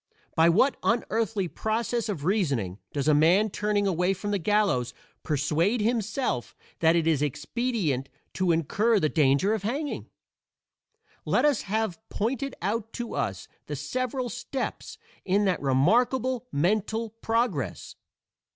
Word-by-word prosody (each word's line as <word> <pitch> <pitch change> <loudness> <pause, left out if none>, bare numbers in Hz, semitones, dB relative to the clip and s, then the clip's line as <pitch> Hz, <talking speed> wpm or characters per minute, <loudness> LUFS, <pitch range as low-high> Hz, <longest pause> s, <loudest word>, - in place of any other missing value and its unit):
By 165 +1 +5
what 230 +11 +3
unearthly 225 -4 0
process 225 +4 -2
of 160 -8 -3
reasoning 140 - 0
does 140 -1 -2
a 155 - +5
man 175 +8 +4
turning 210 0 0
away 180 0 +1
from 205 +3 -4
the 200 - +1
gallows 170 - +1 0.3
persuade 155 - +1
himself 225 - -1 0.2
that 165 0 +4
it 165 -2 +2
is 160 -4 +2
expedient 150 - -1 0.2
to 185 -2 +1
incur 205 +8 +2
the 155 - +1
danger 145 +7 +3
of 220 - -1
hanging? 275 +8 -3 1.1
Let - - +2
us 295 -3 +3
have 215 -2 -2
pointed 260 +5 -2
out 220 +3 -2
to 240 -1 -5
us - - -3 0.2
the - - -3
several 255 0 -2
steps 260 - -5 0.3
in 200 +2 +2
that 185 -3 +1
remarkable 240 - +2
mental 215 +7 0
progress. 225 - -2
205 Hz, 135 wpm, -27 LUFS, 160-230 Hz, 1.1 s, By